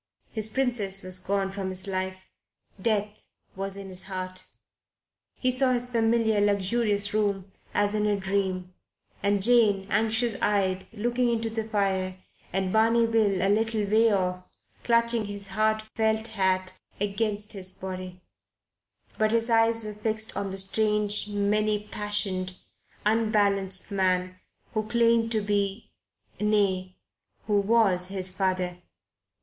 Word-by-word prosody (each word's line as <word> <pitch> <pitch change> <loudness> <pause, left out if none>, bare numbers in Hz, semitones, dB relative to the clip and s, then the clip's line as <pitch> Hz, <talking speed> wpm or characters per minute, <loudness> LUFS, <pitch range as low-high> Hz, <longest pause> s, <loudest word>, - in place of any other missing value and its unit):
His 220 -1 0
Princess 220 -6 +1
was 185 0 +1
gone 195 +1 -1
from 195 -1 -4
his 185 +1 +1
life. 190 -1 -2 0.6
Death 210 -1 -1 0.3
was 195 0 -3
in 195 -1 -8
his 185 0 -7
heart. 185 -1 -4 0.9
He 255 - 0
saw 255 0 +3
his 245 0 0
familiar, 225 -2 +2
luxurious 205 +1 +1
room 200 -3 -1 0.2
as 205 0 +1
in 210 0 +1
a 205 - +2
dream, 190 -2 -2 0.5
and 200 0 +1
Jane, 215 -4 +4
anxious 220 +1 +1
eyed, 190 -2 +1
looking 240 +3 0
into 225 -1 -1
the 225 -1 -3
fire, 190 -3 -1 0.3
and 190 0 -1
Barney 230 +1 +4
Bill 215 -5 +2
a - - +3
little 220 +1 +1
way 220 +3 +4
off, 180 -2 0 0.4
clutching 235 -1 +2
his 200 -1 -7
hard 215 +2 +1
felt 220 0 0
hat 190 -3 0 0.3
against 205 +1 -2
his 190 -2 -3
body; 185 -1 -7 1.0
but 215 0 +3
his 230 +1 +1
eyes 225 0 +4
were 215 0 -5
fixed 220 +1 -1
on 200 - -2
the 190 - -5
strange, 210 +1 +1
many 210 +1 +1
passioned, 205 -3 -1 0.5
unbalanced 205 -3 +1
man 185 -1 0 0.3
who 215 - +1
claimed 230 -1 +2
to 215 - +1
be 205 +1 -2 0.5
nay, 195 -3 +1 0.5
who 205 -1 +2
was 200 -4 +3
his 190 -1 -1
father. 185 -1 -1
205 Hz, 135 wpm, -27 LUFS, 190-220 Hz, 1.0 s, Jane